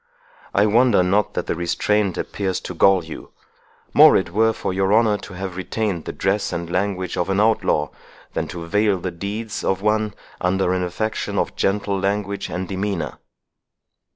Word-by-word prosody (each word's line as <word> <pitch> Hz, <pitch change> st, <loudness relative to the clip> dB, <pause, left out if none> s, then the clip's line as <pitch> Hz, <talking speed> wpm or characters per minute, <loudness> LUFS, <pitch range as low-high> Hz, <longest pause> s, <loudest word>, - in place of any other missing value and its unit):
I 100 Hz, -, +5 dB
wonder 110 Hz, -2 st, +4 dB
not 100 Hz, +2 st, +1 dB
that -, -, -1 dB
the -, -, -1 dB
restraint 95 Hz, +3 st, 0 dB
appears 95 Hz, -3 st, -2 dB
to -, -, -6 dB
gall 95 Hz, +1 st, +4 dB
you—more 80 Hz, -1 st, +1 dB
it -, -, -2 dB
were 110 Hz, +4 st, +3 dB
for 100 Hz, -, -3 dB
your 95 Hz, +1 st, +1 dB
honour 110 Hz, -2 st, +3 dB
to 95 Hz, -, -10 dB
have 95 Hz, -1 st, -5 dB
retained 95 Hz, -2 st, -2 dB
the -, -, -3 dB
dress -, -, -1 dB
and 85 Hz, 0 st, -3 dB
language 95 Hz, 0 st, -1 dB
of 90 Hz, +2 st, -1 dB
an 95 Hz, +1 st, +1 dB
outlaw, 105 Hz, -9 st, +2 dB, 0.4 s
than -, -, -2 dB
to 85 Hz, -1 st, -7 dB
veil 105 Hz, +2 st, +2 dB
the 90 Hz, +1 st, -3 dB
deeds 105 Hz, +5 st, -5 dB
of 95 Hz, +1 st, 0 dB
one 105 Hz, -1 st, +1 dB, 0.3 s
under 90 Hz, 0 st, +1 dB
an 90 Hz, 0 st, 0 dB
affectation 110 Hz, +5 st, -3 dB
of -, -, -1 dB
gentle 100 Hz, 0 st, 0 dB
language 100 Hz, 0 st, -2 dB
and 90 Hz, +2 st, -4 dB
demeanour." 95 Hz, -5 st, -3 dB
95 Hz, 170 wpm, -21 LUFS, 90-105 Hz, 0.4 s, I